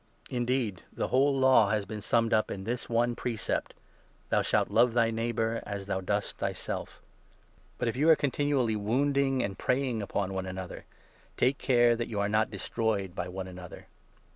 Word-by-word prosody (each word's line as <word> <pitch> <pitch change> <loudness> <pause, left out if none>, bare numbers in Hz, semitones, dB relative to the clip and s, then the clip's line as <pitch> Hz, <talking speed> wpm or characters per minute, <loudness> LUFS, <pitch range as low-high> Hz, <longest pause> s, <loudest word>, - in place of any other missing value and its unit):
Indeed, 120 -5 -1
the - - -3
whole 135 +1 +3
Law 130 -6 +5
has 105 -1 +1
14 - - -15
been 105 0 -6
summed 115 +2 +1
up 110 0 +2
in 95 - -5
this 120 +4 -3
one 120 +1 +1
precept 115 -2 -2 0.2
— - - -33
' - - -35
Thou - - +3
shalt - - +1
love 120 +1 +4
thy 115 -1 +3
neighbour 115 0 -1
as 100 -1 -5
thou 95 -1 -2
dost 100 +2 -2
thyself.* - - -4 0.7
But, - - -1
if 115 - -1
you 150 +5 +3
are 160 - +9
continually 140 -5 +1
wounding 135 +5 +1
and 100 -1 -4
preying 125 -3 0
upon 100 -1 -2
one 95 0 -3
15 95 0 -6
another, 95 -2 -7 0.5
take 130 +2 +2
care 120 -2 +4
that 120 0 -3
you 105 -3 -3
are 100 0 +1
not 110 +1 +2
destroyed 100 -2 -2
by 90 - -4
one 95 +1 -5
another. 90 -1 -10
115 Hz, 190 wpm, -29 LUFS, 100-125 Hz, 0.7 s, are